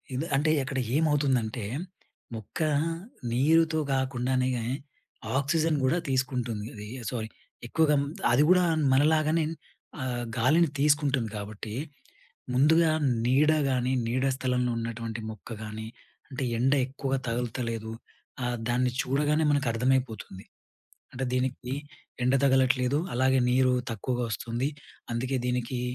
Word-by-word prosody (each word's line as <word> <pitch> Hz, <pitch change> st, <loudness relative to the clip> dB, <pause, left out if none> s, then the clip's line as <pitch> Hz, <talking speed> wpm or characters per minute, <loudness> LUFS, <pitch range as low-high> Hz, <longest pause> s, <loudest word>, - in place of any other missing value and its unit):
ఇద్ 135 Hz, +5 st, -1 dB
అంటే 150 Hz, +3 st, +2 dB
అక్కడ 135 Hz, 0 st, -3 dB, 0.2 s
ఏమవుతుందంటే 135 Hz, -7 st, +1 dB, 0.7 s
మొక్క 110 Hz, -3 st, -8 dB, 0.7 s
నీరుతో 160 Hz, +6 st, +3 dB
గాకుండానే 130 Hz, -1 st, 0 dB
గా 120 Hz, -, -2 dB, 0.8 s
ఆక్సిజన్ 155 Hz, +3 st, +1 dB
గూడా 130 Hz, +6 st, +3 dB
తీసుకుంటుంది 125 Hz, -5 st, -1 dB
అది. 105 Hz, -1 st, -8 dB, 0.2 s
సొ, -, -, -5 dB, 0.5 s
ఎక్కువగా 155 Hz, +3 st, +3 dB, 0.4 s
అది 125 Hz, +5 st, +5 dB
గూడా 180 Hz, 0 st, +6 dB, 0.3 s
మనలాగానే 155 Hz, +3 st, +3 dB, 0.6 s
ఆహ్, 125 Hz, -2 st, -2 dB
గాలిని 155 Hz, +8 st, +4 dB
తీసుకుంటుంది 140 Hz, -5 st, +2 dB
కాబట్టి, 105 Hz, +1 st, -6 dB, 0.8 s
ముందుగా 160 Hz, +5 st, +4 dB, 0.3 s
నీడ 140 Hz, +5 st, +4 dB, 0.2 s
గానీ, 125 Hz, -1 st, +1 dB, 0.2 s
నీడ 130 Hz, +3 st, 0 dB
స్థలంలో 125 Hz, -1 st, 0 dB
ఉన్నటువంటి 115 Hz, 0 st, -4 dB
మొక్క 110 Hz, +1 st, -12 dB
గానీ 110 Hz, 0 st, -6 dB, 0.4 s
అంటే 135 Hz, -1 st, -4 dB
ఎండ 130 Hz, +4 st, +3 dB
ఎక్కువగా 135 Hz, 0 st, -2 dB
తగులుతలేదు. 115 Hz, -1 st, -3 dB, 0.5 s
ఆహ్, 120 Hz, 0 st, -1 dB
దాన్ని 125 Hz, +1 st, +2 dB
చూడగానే 150 Hz, +4 st, +1 dB
మనకు 145 Hz, -2 st, +1 dB
అర్థమైపోతుంది. 115 Hz, -5 st, -1 dB, 0.7 s
అంటే 130 Hz, +1 st, -2 dB
దీనికి 130 Hz, 0 st, -1 dB, 0.5 s
ఎండ 125 Hz, +2 st, +3 dB
తగలట్లేదు 130 Hz, 0 st, +3 dB, 0.2 s
అలాగే 130 Hz, +2 st, +3 dB
నీరు 130 Hz, 0 st, +4 dB, 0.2 s
తక్కువగా 120 Hz, +3 st, -2 dB
వస్తుంది. 120 Hz, +4 st, -2 dB, 0.4 s
అందుకే 125 Hz, +3 st, -1 dB
దీనికి 125 Hz, 0 st, -1 dB
130 Hz, 110 wpm, -28 LUFS, 120-140 Hz, 0.8 s, గూడా